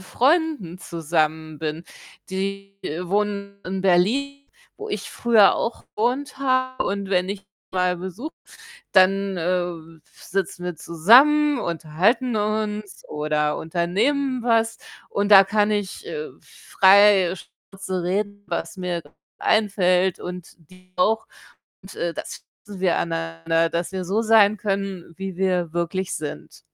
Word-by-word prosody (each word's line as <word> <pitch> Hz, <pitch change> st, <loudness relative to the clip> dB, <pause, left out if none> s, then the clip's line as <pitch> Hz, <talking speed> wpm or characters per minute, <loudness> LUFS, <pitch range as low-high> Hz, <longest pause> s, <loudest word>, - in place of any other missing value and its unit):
Freunden 260 Hz, -, 0 dB
zusammen 155 Hz, -2 st, -2 dB
bin. 160 Hz, +2 st, -4 dB, 0.5 s
Die 195 Hz, +1 st, -4 dB, 0.3 s
wohnen 200 Hz, +1 st, -2 dB
in 190 Hz, +1 st, -3 dB
Berlin, 265 Hz, +11 st, +1 dB, 0.3 s
wo 430 Hz, +1 st, -7 dB
ich -, -, -4 dB
früher 225 Hz, -4 st, +4 dB
auch 230 Hz, -, -3 dB
gewohnt 260 Hz, +5 st, -1 dB
habe, 255 Hz, -1 st, 0 dB
und 200 Hz, -1 st, -3 dB
wenn 180 Hz, 0 st, +1 dB
ich 200 Hz, -1 st, -5 dB, 0.3 s
mal 180 Hz, -1 st, +1 dB
besuche, 190 Hz, -, -7 dB, 0.6 s
dann, 195 Hz, 0 st, +3 dB
äh, 170 Hz, +1 st, -2 dB, 0.2 s
w 165 Hz, -2 st, -9 dB
sitzen 190 Hz, -1 st, -4 dB
wir 180 Hz, -2 st, -4 dB
zusammen, 265 Hz, -, +5 dB
unterhalten 185 Hz, +9 st, 0 dB
uns 210 Hz, -1 st, -2 dB
oder 150 Hz, 0 st, -1 dB
unternehmen 230 Hz, -, 0 dB
was, 225 Hz, -1 st, +2 dB, 0.3 s
und 205 Hz, +1 st, -1 dB
da 195 Hz, -1 st, +10 dB
kann 210 Hz, +1 st, +1 dB
ich, 205 Hz, -2 st, -3 dB
äh, 460 Hz, -1 st, -5 dB
frei 195 Hz, -2 st, +4 dB
Schnauze 190 Hz, 0 st, -7 dB
reden, 205 Hz, +2 st, -2 dB
was 170 Hz, +2 st, -4 dB
mir 180 Hz, -2 st, -3 dB
grad 145 Hz, -, -22 dB, 0.2 s
einfällt 190 Hz, -4 st, +2 dB
und 180 Hz, -1 st, -8 dB, 0.2 s
die 185 Hz, 0 st, -20 dB
auch. 220 Hz, +4 st, +1 dB, 0.6 s
Und, 190 Hz, -, -12 dB
äh, 170 Hz, -1 st, -2 dB
das -, -, -8 dB, 0.2 s
schätzen 200 Hz, -3 st, -9 dB
wir 180 Hz, -3 st, +2 dB
aneinander, 165 Hz, 0 st, -1 dB
dass 170 Hz, +2 st, -3 dB
wir 185 Hz, -1 st, -3 dB
so 200 Hz, +5 st, 0 dB
sein 215 Hz, -2 st, +5 dB
können, 195 Hz, -4 st, -3 dB
wie 190 Hz, -2 st, -6 dB
wir 180 Hz, -3 st, 0 dB
wirklich 175 Hz, +2 st, -2 dB
sind. 150 Hz, -1 st, -7 dB
195 Hz, 130 wpm, -23 LUFS, 175-215 Hz, 0.6 s, da